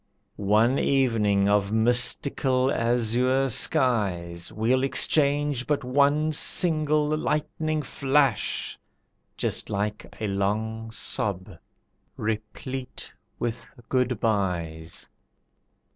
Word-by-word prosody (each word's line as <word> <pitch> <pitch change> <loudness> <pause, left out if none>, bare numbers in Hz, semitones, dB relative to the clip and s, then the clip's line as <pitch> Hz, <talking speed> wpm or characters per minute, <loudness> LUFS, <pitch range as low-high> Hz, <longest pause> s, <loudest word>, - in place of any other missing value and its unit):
One 110 +6 +3
evening 110 -7 +2
of 100 -1 +2
mystical 130 +3 +2
azure 125 +3 +1
skies, 100 - 0
We'll 120 +4 +1
exchange 145 -1 +1
but 145 -3 0
one 145 +4 +2
single 155 -1 +2
lightning 155 0 -1
flash, 140 0 0 0.6
Just - - -2
like 105 +1 -3
a 110 - -2
long 110 +3 -2
sob 100 -3 -3 0.7
replete 110 +5 -5 0.3
with 120 0 -3 0.3
good 125 -3 0
byes. 85 -7 -2
120 Hz, 85 wpm, -25 LUFS, 105-140 Hz, 0.7 s, One